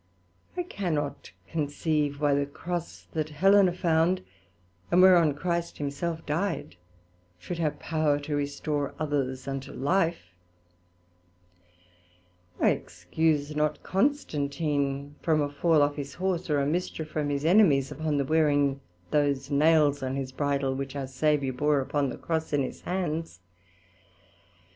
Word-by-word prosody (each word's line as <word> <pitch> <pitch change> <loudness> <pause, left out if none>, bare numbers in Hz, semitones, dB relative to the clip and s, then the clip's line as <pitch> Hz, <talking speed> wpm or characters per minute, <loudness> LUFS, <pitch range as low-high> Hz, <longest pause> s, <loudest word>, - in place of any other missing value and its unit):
I 355 - 0
cannot 160 - -3 0.2
conceive 150 -1 -1
why 145 -1 +3
the 140 0 +1
Cross 170 +3 -5
that 155 -1 -2
Helena 190 +5 +5
found, 175 +1 +1 0.7
and 175 - +4
whereon 175 -6 +6
Christ 170 +2 -2
himself 160 +3 -3
dyed, 155 - -2 0.6
should 170 - -6
have 155 -3 0
power 155 -3 +1
to 145 +1 -3
restore 145 0 -2
others 135 -4 -2
unto 135 0 -4
life: 160 - 0 2.3
I - - +4
excuse 145 - -1
not 150 0 0
Constantine 145 - -1
from 160 -2 +2
a 145 -1 0
fall 155 +1 +3
off 145 +1 0
his 140 -1 -6
Horse, 180 -2 -2
or 145 -1 +2
a 140 - +1
mischief 160 0 -2
from 150 -1 -2
his 145 +1 -2
enemies, 160 -7 +4
upon 150 0 -1
the 140 - +1
wearing 145 -2 +2 0.3
those 140 -1 +1
nails 150 -1 +4
on 130 0 -2
his 135 -1 -3
bridle, 140 -1 0
which 135 +1 -5
our 140 -1 -3
Saviour 135 0 0
bore 145 +2 +2
upon 140 +1 0
the - - -6
Cross 160 -2 -3
in 145 -1 +2
his 130 - -6
hands. 165 - -3
150 Hz, 135 wpm, -27 LUFS, 140-165 Hz, 2.3 s, whereon